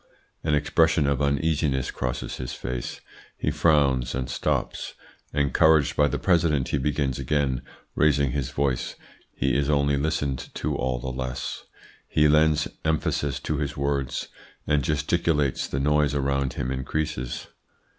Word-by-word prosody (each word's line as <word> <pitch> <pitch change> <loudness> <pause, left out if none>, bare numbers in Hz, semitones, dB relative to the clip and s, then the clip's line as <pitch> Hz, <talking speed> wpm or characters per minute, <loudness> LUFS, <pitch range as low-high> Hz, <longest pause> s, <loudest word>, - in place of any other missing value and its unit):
"An 75 -2 +2
expression 80 +1 +3
of 70 -1 +1
uneasiness 70 -2 +1
crosses 65 -1 -3
his 65 - -5
face; - - -5 0.4
he - - 0
frowns 70 -6 +2
and 65 -1 -3
stops. - - -2 0.4
Encouraged 75 +1 +3
by 75 - +4
the - - -1
President, 80 -7 +2
he 70 - 0
begins 70 -2 -1
again, 70 -2 0 0.3
raising 70 -3 +3
his 70 -1 -2
voice. 70 -3 -1 0.4
He 70 - 0
is 70 0 +1
only 70 -1 +2
listened 70 -3 -1
to - - -2
all 65 -1 -1
the 65 +2 -4
less. 65 0 -4 0.4
He 75 0 +3
lends 75 0 +4 0.2
emphasis 75 -2 0
to 75 - -2
his 75 +1 -3
words, 70 -2 -1 0.4
and 75 -1 +2
gesticulates: 75 0 +1
the 65 - -2
noise 75 0 +2
around 70 -2 0
him 65 -1 -3
increases. 65 -1 -3
70 Hz, 140 wpm, -25 LUFS, 65-75 Hz, 0.4 s, by